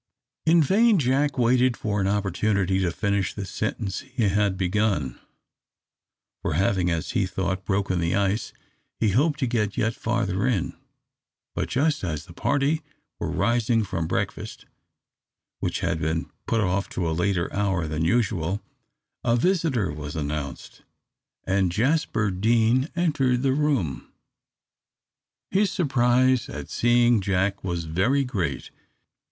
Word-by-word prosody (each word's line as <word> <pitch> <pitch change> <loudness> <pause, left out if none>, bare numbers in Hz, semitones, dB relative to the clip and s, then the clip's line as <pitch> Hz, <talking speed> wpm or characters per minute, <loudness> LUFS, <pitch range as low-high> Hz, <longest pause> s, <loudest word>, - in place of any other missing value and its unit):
In 165 0 +6
vain 215 - +4
Jack 140 0 +1
waited 125 0 +3
for 105 -2 -1
an 95 - +1
opportunity 100 -1 +1
to 95 -2 +1
finish 100 +2 -1
the 100 - -4
sentence 100 -1 -3
he 130 -3 -4
had 100 -1 +1
begun, 95 - 0 1.2
for - - -1
having, 90 +2 +1
as 85 -2 -2
he 95 - +1
thought, 95 0 -3
broken 95 -2 0
the 85 0 0
ice, 100 +2 0 0.5
he 110 - +2
hoped 145 - +2
to - - +3
get 110 -4 -1
yet 110 +2 +1
farther 110 -2 -1
in, 110 -9 -1 0.8
but - - -2
just 145 0 +1
as 80 -3 -3
the 85 - -13
party 145 - +1 0.4
were - - -2
rising 115 -1 +1
from 80 -5 -3
breakfast, - - -3 0.9
which - - -2
had 80 - 0
been 80 +1 -2 0.2
put 115 - +1
off 100 0 0
to 90 -2 -2
a - - 0
later 90 +1 0
hour 95 -4 0
than 75 +1 -2
usual, 95 -1 +1 0.6
a 120 -1 +3
visitor 140 - +1
was 75 +1 -6
announced, 75 -2 -5 0.6
and 95 -2 +1
Jasper 115 - +1
Deane 115 - +2
entered 140 -7 +1
the 135 -1 +3
room. 135 - -1 1.4
His 200 +1 +3
surprise 130 - +2
at - - -7
seeing 120 -1 +3
Jack 95 +1 0
was 85 -3 -2
very 95 - +1
great. 95 - -3
105 Hz, 135 wpm, -25 LUFS, 90-125 Hz, 1.4 s, In